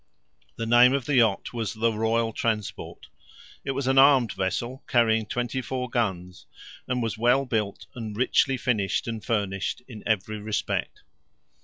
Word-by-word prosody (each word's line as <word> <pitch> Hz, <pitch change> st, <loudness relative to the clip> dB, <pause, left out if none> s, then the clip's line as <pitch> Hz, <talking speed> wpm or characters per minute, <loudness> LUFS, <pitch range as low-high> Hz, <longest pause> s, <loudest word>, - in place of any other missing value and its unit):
The 115 Hz, -, -4 dB
name 120 Hz, +2 st, +6 dB
of 140 Hz, -2 st, -1 dB
the 145 Hz, -3 st, +1 dB
yacht 110 Hz, -3 st, +2 dB
was 115 Hz, -2 st, -3 dB
the 115 Hz, +1 st, +1 dB
Royal 115 Hz, +1 st, 0 dB
Transport. 110 Hz, -3 st, -3 dB, 0.6 s
It 135 Hz, -, -2 dB
was 135 Hz, 0 st, -3 dB
an 135 Hz, +1 st, +4 dB
armed 135 Hz, -5 st, +6 dB
vessel, 120 Hz, +7 st, -3 dB
carrying 110 Hz, -3 st, +2 dB
twenty 125 Hz, +3 st, -2 dB
four 125 Hz, 0 st, -4 dB
guns, 90 Hz, -7 st, -3 dB, 0.4 s
and 125 Hz, -1 st, -1 dB
was 110 Hz, -1 st, -3 dB
well 125 Hz, +4 st, +3 dB
built, 110 Hz, -5 st, -2 dB
and 110 Hz, -4 st, -6 dB
richly 130 Hz, +2 st, +2 dB
finished 110 Hz, -6 st, -1 dB
and 115 Hz, -2 st, -4 dB
furnished 100 Hz, -1 st, -2 dB
in 110 Hz, -5 st, -10 dB
every 110 Hz, 0 st, -1 dB
respect. 105 Hz, 0 st, -3 dB
115 Hz, 155 wpm, -26 LUFS, 110-125 Hz, 0.6 s, name